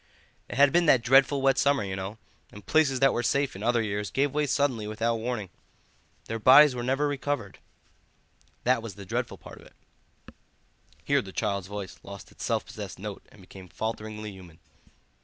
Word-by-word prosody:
It - - -6
had 140 0 +5
been 175 -1 +3
that 130 -5 +5
dreadful 135 +3 +4
wet 135 -1 +3
summer, 140 -4 +2
you 95 -1 -4
know, 95 +3 -6 0.3
and 105 -1 -13
places 150 -4 +2
that 135 -1 +5
were 120 - 0
safe 140 +2 0
in 95 - -8
other 120 +1 +1
years 105 -1 -3
gave 140 0 0
way 150 0 0
suddenly 130 -7 0
without 115 +2 -1
warning. 110 -5 -4 0.7
Their 115 0 -4
bodies 135 +5 +7
were 125 - -4
never 135 +4 0
recovered. 145 -7 -3 1.0
That 125 -1 +2
was 115 -5 -8
the 100 - -10
dreadful - - -3
part - - -13
of - - -16
it." - - -23 1.3
Here - - +2
the 95 - -10
child's 100 -2 -2
voice 100 -1 -7
lost 100 0 -11
its - - -10
self - - -1
possessed - - -8
note - - -7
and - - -17
became 95 0 -13
falteringly 110 0 -5
human. 90 -4 -14
115 Hz, 185 wpm, -27 LUFS, 100-135 Hz, 1.3 s, bodies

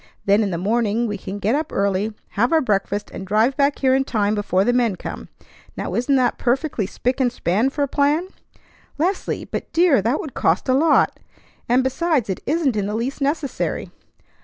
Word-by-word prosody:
Then 200 +2 +4
in 205 - 0
the 170 - -2
morning 220 +4 0
we 210 -2 -2
can 195 +2 -6
get 205 +3 0
up 305 +2 -1
early, 200 +2 0 0.2
have 235 +5 0
our 325 - +5
breakfast, 205 -5 -1
and 190 - -7
drive 220 +6 +2
back 280 0 +2
here 260 -1 +2
in 265 0 +3
time 210 -5 0
before 200 -3 +1
the 245 - +2
men 240 -5 +2
come. - - -7 0.5
Now - - -4
isn't 250 +4 +1
that 255 -2 +1
perfectly 250 - 0
spick 250 +5 -2
and 250 -2 +2
span 220 +2 +1
for 285 +1 -2
a - - 0
plan?" 295 +6 +1 0.7
"Leslie! 365 +6 -1
But, - - -5
dear, 330 - +4
that 235 +8 0
would 285 - -6
cost - - +1
a 255 - +3
lot! 300 +3 +3 0.5
And, 250 +2 +4
besides, 265 - 0
it 185 - -4
isn't 295 -4 +1
in 200 -2 -1
the 210 - -3
least 255 +6 -3
necessary." 285 0 -2
245 Hz, 200 wpm, -21 LUFS, 205-280 Hz, 0.7 s, our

